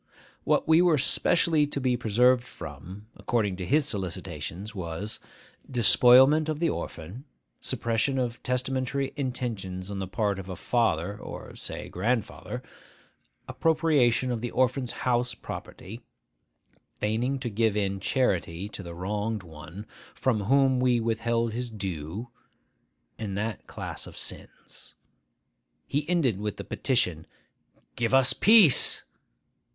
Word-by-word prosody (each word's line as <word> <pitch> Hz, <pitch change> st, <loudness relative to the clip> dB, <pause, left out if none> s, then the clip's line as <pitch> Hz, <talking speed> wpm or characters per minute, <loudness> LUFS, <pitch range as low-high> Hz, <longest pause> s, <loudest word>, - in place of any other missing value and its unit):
What -, -, +1 dB
we 160 Hz, +2 st, +6 dB
were 175 Hz, -4 st, +4 dB
specially 155 Hz, +2 st, +3 dB
to 140 Hz, -, -3 dB
be 130 Hz, -2 st, +1 dB
preserved 120 Hz, +2 st, +3 dB
from, 100 Hz, -4 st, -10 dB
according 105 Hz, -5 st, -1 dB
to 90 Hz, -, -5 dB
his 145 Hz, +1 st, +3 dB
solicitations, 95 Hz, -, -5 dB
was, 95 Hz, +2 st, -3 dB, 0.5 s
despoilment 130 Hz, +5 st, +6 dB
of 155 Hz, -, -1 dB
the 165 Hz, -1 st, +1 dB
orphan, 90 Hz, -, -7 dB, 0.3 s
suppression 115 Hz, +4 st, -1 dB
of 120 Hz, -2 st, -2 dB
testamentary 130 Hz, +2 st, -2 dB
intentions 110 Hz, -9 st, -4 dB
on 100 Hz, -, -4 dB
the 95 Hz, -, -4 dB
part 100 Hz, 0 st, -1 dB
of 95 Hz, 0 st, -8 dB
a 95 Hz, -, -5 dB
father 100 Hz, -3 st, 0 dB
or -, -, -9 dB
(say) -, -, -6 dB
grandfather, 115 Hz, +4 st, -3 dB, 0.8 s
appropriation 150 Hz, -7 st, +2 dB
of 115 Hz, -2 st, -3 dB
the 120 Hz, -, -3 dB
orphan's 130 Hz, 0 st, 0 dB
house 125 Hz, 0 st, +1 dB
property, 110 Hz, +6 st, -9 dB, 1.0 s
feigning 115 Hz, +6 st, -1 dB
to 130 Hz, -2 st, -4 dB
give 110 Hz, 0 st, +1 dB
in 100 Hz, -1 st, -1 dB
charity 95 Hz, -, -1 dB
to 105 Hz, -, -8 dB
the 85 Hz, -2 st, -9 dB
wronged 105 Hz, +3 st, -3 dB
one 85 Hz, +4 st, -10 dB, 0.3 s
from 110 Hz, -6 st, 0 dB
whom 135 Hz, +1 st, +3 dB
we 125 Hz, -1 st, +2 dB
withheld 115 Hz, 0 st, -1 dB
his 120 Hz, +1 st, -4 dB
due; 95 Hz, +1 st, -5 dB, 0.9 s
and 100 Hz, -3 st, -4 dB
that 110 Hz, 0 st, -4 dB
class -, -, -6 dB
of -, -, -12 dB
sins. -, -, -8 dB, 0.9 s
He 150 Hz, +3 st, -2 dB
ended 140 Hz, -, +1 dB
with 105 Hz, -1 st, -3 dB
the -, -, -6 dB
petition, 90 Hz, -, 0 dB, 0.7 s
'Give 120 Hz, +2 st, +1 dB
us 135 Hz, -1 st, +5 dB
peace! 210 Hz, -, +7 dB
115 Hz, 130 wpm, -27 LUFS, 100-130 Hz, 1.0 s, peace